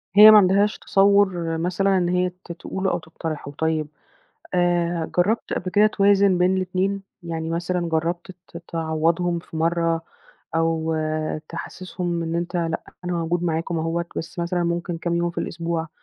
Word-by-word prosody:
هي 210 Hz, +1 st, +11 dB
ما 215 Hz, -, +9 dB
عندهاش 200 Hz, +1 st, +4 dB
تصوُّر 195 Hz, -4 st, +3 dB
مثلًا 185 Hz, +3 st, +1 dB
إن 175 Hz, -1 st, +1 dB
هي 180 Hz, 0 st, +1 dB, 0.2 s
ت -, -, -8 dB
تقوله 190 Hz, +2 st, -3 dB
أو 175 Hz, -, -1 dB
تقترحه. 160 Hz, -2 st, -6 dB
طيب، 160 Hz, +1 st, -1 dB, 0.7 s
آآ 175 Hz, -2 st, +1 dB
جرّبت 205 Hz, +6 st, +1 dB
قبْل 185 Hz, -, -2 dB
كده 210 Hz, +3 st, +5 dB
توازُن 200 Hz, -2 st, +3 dB
بين 180 Hz, +1 st, +3 dB
الإتنين، 190 Hz, +2 st, -1 dB, 0.2 s
يعني 165 Hz, -1 st, -4 dB
مثلًا 175 Hz, +1 st, -1 dB
جرّبت 170 Hz, +3 st, -1 dB, 0.2 s
ت 155 Hz, -, -11 dB
تعوّضهم 165 Hz, +1 st, 0 dB
في 165 Hz, -, -10 dB
مرّة 165 Hz, 0 st, +1 dB, 0.5 s
أو 165 Hz, 0 st, +1 dB, 0.5 s
تحسّسهم 175 Hz, 0 st, -4 dB
إن 165 Hz, 0 st, -3 dB
أنت 170 Hz, +1 st, -3 dB
لأ، 165 Hz, -2 st, -1 dB, 0.2 s
أنا 180 Hz, -, -2 dB
موجود 170 Hz, 0 st, -1 dB
معاكم 165 Hz, 0 st, -1 dB
أهوّة، 165 Hz, +2 st, -1 dB
بس 165 Hz, -, -6 dB
مثلًا 175 Hz, +1 st, 0 dB
ممكن 170 Hz, 0 st, -2 dB
كام 170 Hz, +1 st, -2 dB
يوم 170 Hz, 0 st, 0 dB
في 170 Hz, -, -6 dB
الأسبوع 165 Hz, -1 st, -3 dB
170 Hz, 155 wpm, -23 LUFS, 165-185 Hz, 0.7 s, هي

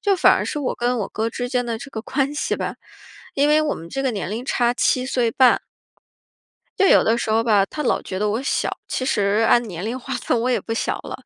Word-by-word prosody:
就 405 Hz, -2 st, +2 dB
反 -, -, +6 dB
而 -, -, -1 dB
是 -, -, -3 dB
我 280 Hz, -, -2 dB
跟 245 Hz, +1 st, 0 dB
我 195 Hz, -, -3 dB
哥 220 Hz, +1 st, -2 dB
之 245 Hz, +2 st, -4 dB
间 245 Hz, -1 st, -1 dB
的 230 Hz, -1 st, -2 dB
这 275 Hz, +5 st, -10 dB
个 220 Hz, -, -5 dB
关 275 Hz, +4 st, -1 dB
系 295 Hz, -, -1 dB
吧， -, -, -4 dB, 0.6 s
因 285 Hz, +1 st, +2 dB
为 305 Hz, +1 st, +4 dB
我 305 Hz, -1 st, 0 dB
们 165 Hz, -, -9 dB
这 270 Hz, -, -3 dB
个 265 Hz, -, +1 dB
年 200 Hz, -3 st, -4 dB
龄 225 Hz, +3 st, -4 dB
差 240 Hz, -2 st, +1 dB
7 255 Hz, 0 st, +1 dB
岁 245 Hz, -3 st, 0 dB
半。 255 Hz, +2 st, +4 dB, 1.2 s
就 390 Hz, -, +4 dB
有 -, -, +6 dB
的 225 Hz, +1 st, +2 dB
时 225 Hz, -, -2 dB
候 225 Hz, +1 st, +2 dB
吧， 210 Hz, -4 st, +3 dB
他 300 Hz, -, -6 dB
老 250 Hz, -, +1 dB
觉 185 Hz, -, -5 dB
得 210 Hz, 0 st, +1 dB
我 220 Hz, +4 st, -1 dB
小， -, -, 0 dB, 0.2 s
其 -, -, -2 dB
实 210 Hz, -3 st, +1 dB
按 240 Hz, -, +5 dB
年 175 Hz, -3 st, -6 dB
龄 235 Hz, +4 st, -3 dB
划 265 Hz, +1 st, -6 dB
分， 235 Hz, -, 0 dB
我 235 Hz, -, -1 dB
也 250 Hz, -, +1 dB
不 -, -, -7 dB
小 225 Hz, -, -1 dB
了， -, -, -7 dB
240 Hz, 270 characters per minute, -21 LUFS, 220-265 Hz, 1.2 s, 反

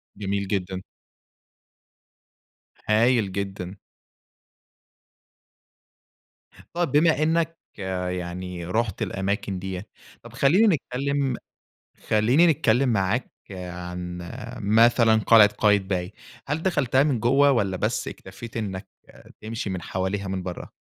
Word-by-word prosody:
جميل 100 Hz, 0 st, -2 dB
جدًا. 95 Hz, -1 st, -2 dB, 2.1 s
هايل 110 Hz, -1 st, +3 dB
جدًا. 95 Hz, -1 st, -4 dB, 3.0 s
طَب 175 Hz, 0 st, -1 dB
بما 155 Hz, +1 st, +4 dB
إنَّك 165 Hz, +1 st, +1 dB, 0.2 s
يعني 90 Hz, -2 st, -4 dB
رُحت 110 Hz, +2 st, -1 dB
الأماكن 95 Hz, 0 st, -2 dB
دِيَّة، 95 Hz, +1 st, -5 dB, 0.4 s
طَب -, -, -12 dB
خلِّيني 180 Hz, +11 st, +4 dB
نتكلم 135 Hz, -1 st, -2 dB, 0.7 s
خلِّيني 120 Hz, +10 st, +4 dB
نتكلم 135 Hz, -4 st, +3 dB
معاك 110 Hz, +2 st, 0 dB, 0.2 s
عن 90 Hz, -1 st, -6 dB, 0.4 s
مثلًا 115 Hz, +2 st, +4 dB
قلعة 110 Hz, -2 st, +8 dB
قايتباي. 95 Hz, -3 st, +1 dB, 0.3 s
هل 150 Hz, +3 st, -2 dB
دخلتها 135 Hz, -8 st, +2 dB
من 140 Hz, -6 st, +1 dB
جوّه، 135 Hz, +5 st, +4 dB
والَّا 100 Hz, -7 st, 0 dB
بس -, -, -1 dB
اكتفيت 105 Hz, +5 st, -10 dB
إنّك 100 Hz, -3 st, -4 dB, 0.5 s
تمشي 110 Hz, -1 st, -4 dB
من 95 Hz, -2 st, -4 dB
حواليها 95 Hz, +5 st, -3 dB
من 95 Hz, -1 st, -3 dB
برّه؟ 90 Hz, -1 st, -7 dB
105 Hz, 100 wpm, -24 LUFS, 95-125 Hz, 3.0 s, قلعة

